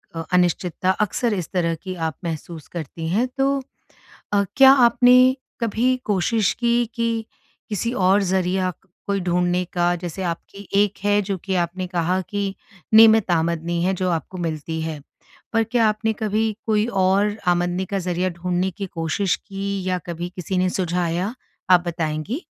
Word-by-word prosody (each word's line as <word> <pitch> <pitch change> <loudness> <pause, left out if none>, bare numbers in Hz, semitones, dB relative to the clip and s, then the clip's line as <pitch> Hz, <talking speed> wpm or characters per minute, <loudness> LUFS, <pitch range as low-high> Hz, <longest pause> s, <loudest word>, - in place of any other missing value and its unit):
अ, 165 - -3
अनिश्चितता 180 +1 +1
अक्सर 215 +3 0
इस 180 -6 -3
तरह 170 -3 +1
की 185 -1 -5
आप 160 - -5
महसूस 165 -1 -6
करती 165 -1 -6
हैं, 220 +8 +1
तो 275 +1 +2 0.7
अ, 200 0 +3
क्या 270 0 +9
आपने 245 -1 +5 0.5
कभी 235 +3 +1
कोशिश 210 +2 +1
कि, 240 0 +1
कि 230 -1 -1 0.4
किसी 225 +3 -2
और 195 -2 +3
ज़रिया 185 0 0 0.4
कोई 200 -1 0
ढूँढने 180 0 +1
का? 175 0 +2
जैसे 175 +1 -6
आपकी 185 +3 -6
एक 205 -1 -2
है 205 0 +3
जो 195 0 -2
कि 195 -1 -1
आपने 180 +2 -1
कहा 180 +1 0
कि 200 -1 -2 0.4
नियमित 220 -3 +7
आमदनी 170 0 0
है 190 +1 +1
जो 185 0 -1
आपको 170 +2 -3
मिलती 160 0 -4
है। 160 -2 -4 0.5
पर 225 -1 +3
क्या 225 0 +2
आपने 215 +1 0
कभी 215 0 -1
कोई 215 0 +2
और 200 0 +2
आमदनी 175 +1 +1
का 195 - +1
ज़रिया 180 0 -1
ढूँढने 180 +2 -1
की 195 +1 -6
कोशिश 170 +3 -1
की? 195 -1 -4
या 185 -1 0
कभी 175 0 -4
किसी 180 +1 -2
ने 185 0 +2
सुझाया? 180 +3 -1 0.4
आप 180 -1 +6
बताएँगी? 165 - -3
185 Hz, 160 wpm, -22 LUFS, 175-210 Hz, 0.7 s, क्या